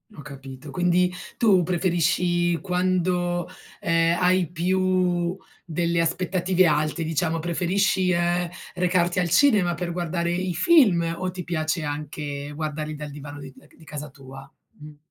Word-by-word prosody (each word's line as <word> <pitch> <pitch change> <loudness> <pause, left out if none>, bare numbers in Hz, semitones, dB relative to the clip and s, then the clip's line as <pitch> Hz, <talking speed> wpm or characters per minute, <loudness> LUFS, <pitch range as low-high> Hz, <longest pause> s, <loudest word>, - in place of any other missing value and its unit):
Ho - - -9
capito, 135 0 -10
quindi 180 +3 +2 0.3
tu 200 -6 +4
preferisci 175 0 +1
quando, 180 -1 0 0.3
ehm, 165 0 +2
hai 180 -1 +3
più 180 0 0 0.3
delle 170 0 -1
aspettative 180 +2 +1
alte, 155 +1 +1
diciamo, 160 +1 -1
preferisci, 180 +3 +1
ehm, 175 0 +1 0.3
recarti 180 0 +1
al 175 - 0
cinema 195 - +4
per 175 +1 -4
guardare 170 0 -2
i 180 0 -1
film 180 - +4
o 185 - -2
ti 180 -1 -6
piace 155 0 -2
anche 145 -1 -5
guardarli 155 0 -4
dal 150 0 -7
divano 145 0 -9
di 135 -1 -10
uhm, - - -19
c - - -24
di 165 - -18
casa 150 -1 -7
tua? 135 0 -12 0.3
Mh 150 0 -12
175 Hz, 145 wpm, -24 LUFS, 155-180 Hz, 0.3 s, tu